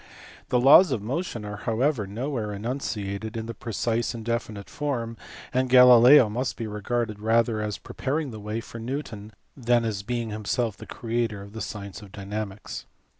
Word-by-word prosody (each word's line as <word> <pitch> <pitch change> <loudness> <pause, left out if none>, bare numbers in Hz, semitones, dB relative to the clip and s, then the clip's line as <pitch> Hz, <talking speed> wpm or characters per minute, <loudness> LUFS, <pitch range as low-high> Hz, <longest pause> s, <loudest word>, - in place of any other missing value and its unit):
The 125 - +3
laws 140 +7 +8
of 115 -6 -1
motion 120 - -3
are 105 0 -5
however 115 +1 0
nowhere 115 0 -3
enunciated 110 -1 -4
in 110 0 -4
a 115 - -4
precise 115 +1 -2
and 115 -1 -7
definite 110 -4 -3
form, 120 -6 -3 0.4
and 130 0 +1
Galileo 125 +1 +8
must 120 +5 -3
be 115 - -3
regarded 110 +1 -2
rather 110 0 +2
as 105 -1 -3
prepaiing 145 0 -3
the 110 - -8
way 105 +2 -4
for 115 - -9
Newton 115 -4 -5 0.2
than 120 -2 +2
as 105 -3 -2
being 115 +1 -3
himself 110 +1 -1
the - - -11
creator 115 -3 -2
of 100 +1 -13
the 110 - -6
science 100 -1 -6
of 100 -2 -13
dynamics. 100 0 -6
115 Hz, 170 wpm, -26 LUFS, 105-125 Hz, 0.4 s, laws